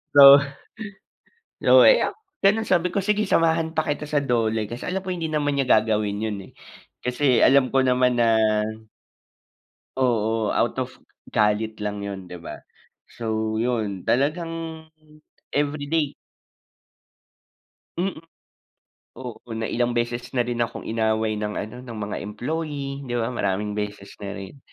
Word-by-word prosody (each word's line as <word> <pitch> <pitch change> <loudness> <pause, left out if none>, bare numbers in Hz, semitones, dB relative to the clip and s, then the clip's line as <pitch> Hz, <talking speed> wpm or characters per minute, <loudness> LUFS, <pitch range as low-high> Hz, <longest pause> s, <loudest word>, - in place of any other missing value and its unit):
So, 140 0 +11 1.2
lo - - +7
eh, - - +7
oh, - - -10 0.3
gano'n 215 +3 +3
sabi 180 0 +2
ko, 200 - +1
"Sige, 210 0 +2
samahan 165 -2 +2
pa 155 - +2
kita 150 +1 -2
sa 150 - +1
DOLE", 115 -4 0
kasi 120 +1 -6
alam 190 +1 -2
ko, 190 - -7
hindi 170 -3 -2
naman 145 -2 0
niya 135 - +2
gagawin 105 -1 +2
'yon 110 -2 -2
eh. - - -21 0.5
Kasi 125 0 +2
alam 135 -1 +5
ko 135 - +4
naman 125 0 +3
na 115 -1 +4 1.6
Oo, 115 -3 +1
out - - +1
of - - -3 0.4
galit 105 +1 +2
lang 105 0 -3
'yon, 100 -2 -5
'di 90 - -8
ba? 85 - -9 0.5
So, 110 -1 -2
'yon 110 -6 -2
talagang 150 +6 +1 1.0
everyday 145 +1 0 1.9
Mm. 180 -3 -2 0.9
Oo, 125 -3 -8 0.2
na 110 - -3
ilang 120 0 0
beses 120 +1 -2
na 120 - +3
rin 120 0 -3
akong 115 -1 -2
inaway 110 -1 0
ng 105 0 -3
ano, 110 +4 -5
ng 120 -3 -8
mga 105 - -4
employee, 140 +4 -4
'di 120 - -2
ba. 115 +1 -1
Maraming 105 -2 -1
beses 105 -1 -5
na 100 0 -5
rin 100 +8 -9
120 Hz, 145 wpm, -24 LUFS, 110-145 Hz, 1.9 s, So